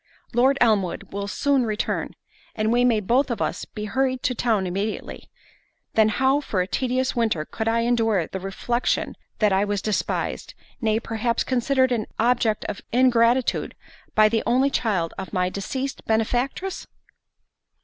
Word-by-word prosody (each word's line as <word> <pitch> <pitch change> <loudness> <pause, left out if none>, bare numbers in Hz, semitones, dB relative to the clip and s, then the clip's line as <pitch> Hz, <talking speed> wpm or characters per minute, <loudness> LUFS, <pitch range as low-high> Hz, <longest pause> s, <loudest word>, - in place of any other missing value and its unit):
Lord 260 +4 +4
Elmwood 210 -6 +1
will 200 0 -3
soon 275 +5 +1
return, 215 -2 -2 0.4
and 215 0 0
we 240 +1 +3
may 235 -4 +3
both 250 +7 +2
of 235 - -2
us - - -2
be 210 -1 -7
hurried 260 +4 -1
to 250 - +1
town 225 -5 +1
immediately—then 210 +2 -3
how 265 +6 +2
for 210 -9 -2
a 180 - +2
tedious 255 +6 -1
winter 220 -10 0
could 220 +6 -4
I 230 +1 +2
endure 225 -6 +2
the 190 - -6
reflexion 195 +6 -1 0.2
that 210 -3 +3
I 190 +1 +3
was 205 -1 -1
despised, 210 +1 -2 0.3
nay, 220 -1 +2
perhaps 230 0 -1
considered 260 +1 +1
as 240 - +2
an 215 - -5
object 230 -2 +1
of 205 - -5
ingratitude, 245 0 +2 0.4
by 215 0 +6
the 225 0 +1
only 260 +3 +3
child 190 -11 0
of 190 - -7
my 180 -1 +1
deceased 260 +8 -4
benefactress?" 245 - -1
230 Hz, 155 wpm, -24 LUFS, 210-250 Hz, 0.4 s, by